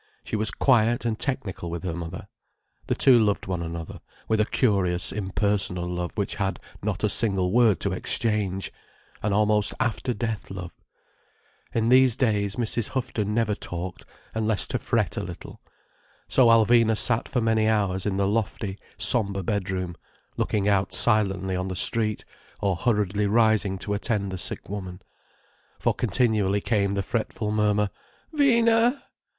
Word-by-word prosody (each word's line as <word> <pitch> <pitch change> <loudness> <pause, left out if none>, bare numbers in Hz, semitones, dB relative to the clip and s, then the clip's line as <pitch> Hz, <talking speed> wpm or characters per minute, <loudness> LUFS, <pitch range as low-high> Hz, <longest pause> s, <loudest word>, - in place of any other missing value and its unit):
She - - -4
was 110 0 +1
quiet 120 -2 +2
and 115 -2 -1
technical 110 -11 -2
with 85 +1 -5
her 90 -3 -3
mother. 85 +1 -7 0.6
The - - 0
two 125 -3 +5
loved 105 -2 +1
one 90 -2 -3
another, 85 -1 -6 0.3
with 110 -1 +2
a 105 - 0
curious 95 -7 +1
impersonal 95 -3 -1
love 90 +2 -4
which 100 -2 -2
had 95 -1 -2 0.2
not 105 -1 -3
a - - +4
single 95 -4 +1
word 115 -5 +4
to - - 0
exchange: 105 -4 -1 0.5
an 105 - -1
almost 105 0 +2
after 115 +3 -1
death 110 -1 -4
love. 90 -2 -7 1.0
In 115 0 0
these 130 -2 +5
days 105 -6 0
Mrs. 115 -1 -1
Houghton 105 -5 -2
never 115 -2 +1
talked—unless 100 +4 -4
to - - -1
fret - - -1
a - - -1
little. - - -9 0.7
So 130 -3 +4
Alvina 115 0 +4
sat 115 0 +3
for 125 - -1
many 110 -1 +2
hours 100 -3 0
in 95 -1 -1
the 100 0 +1
lofty, 105 -1 -2 0.2
sombre 100 -5 +2
bedroom, 95 -3 -2 0.4
looking 100 -1 -1
out 100 -2 +1
silently 95 -4 +2
on 90 +1 -2
the 95 - -4
street, 105 +3 +2 0.3
or 100 -2 0
hurriedly 105 -1 0
rising 110 -3 +2
to 100 +2 -4
attend 100 -2 -1
the 95 - -5
sick - - 0
woman. 95 -2 -7 0.7
For - - +1
continually 105 -5 +1
came 100 -2 0
the 100 0 -1
fretful 110 0 -3
murmur: 105 -1 +1 0.4
"Vina!" 235 -3 +3
105 Hz, 150 wpm, -25 LUFS, 95-115 Hz, 1.0 s, two